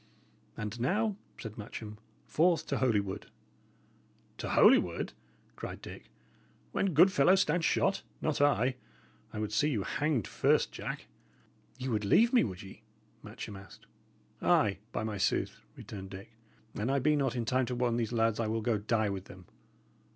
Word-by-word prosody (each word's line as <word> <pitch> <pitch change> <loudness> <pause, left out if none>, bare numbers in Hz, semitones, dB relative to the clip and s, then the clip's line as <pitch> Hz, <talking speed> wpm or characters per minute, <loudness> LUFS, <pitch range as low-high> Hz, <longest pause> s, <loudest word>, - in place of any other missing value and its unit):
"And 105 +2 -5
now," 205 - +1 0.2
said 110 -1 -8
Matcham, 105 0 -7 0.3
"forth 170 +1 +2
to - - -2
Holywood." 105 -6 0 1.1
"To - - -4
Holywood!" - - +4 0.4
cried - - -6
Dick, - - -10 0.7
"when 195 -5 0
good 180 +5 +7
fellows 190 0 +5
stand 165 +3 +1
shot? 195 +4 +2 0.2
Not 155 -2 -1
I! 130 -3 +3 0.5
I - - -7
would 105 -1 -2
see 145 +8 +3
you 110 -9 -1
hanged 145 -4 0
first, - - +2
Jack!" - - -6 0.7
"Ye 130 0 -4
would 110 -4 0
leave 230 - +4
me, 250 - +6
would 95 -2 -5
ye?" 95 - -12 0.4
Matcham 105 - -8
asked. 95 0 -13 0.6
"Ay, 100 -2 +3
by - - -2
my 110 -2 -3
sooth!" - - 0
returned 95 -2 -8
Dick. 95 +3 -10 0.4
"An 105 +4 -2
I 140 - +2
be 150 +3 +3
not 135 -4 0
in 120 -2 -1
time 130 +1 +1
to 125 - -2
warn 120 -1 +1
these 115 -2 -1
lads, 115 -2 +1
I 115 - 0
will 110 +1 -1
go 110 -2 +1
die 110 0 +1
with 95 -1 -5
them. 90 0 -13
115 Hz, 165 wpm, -31 LUFS, 105-145 Hz, 1.1 s, good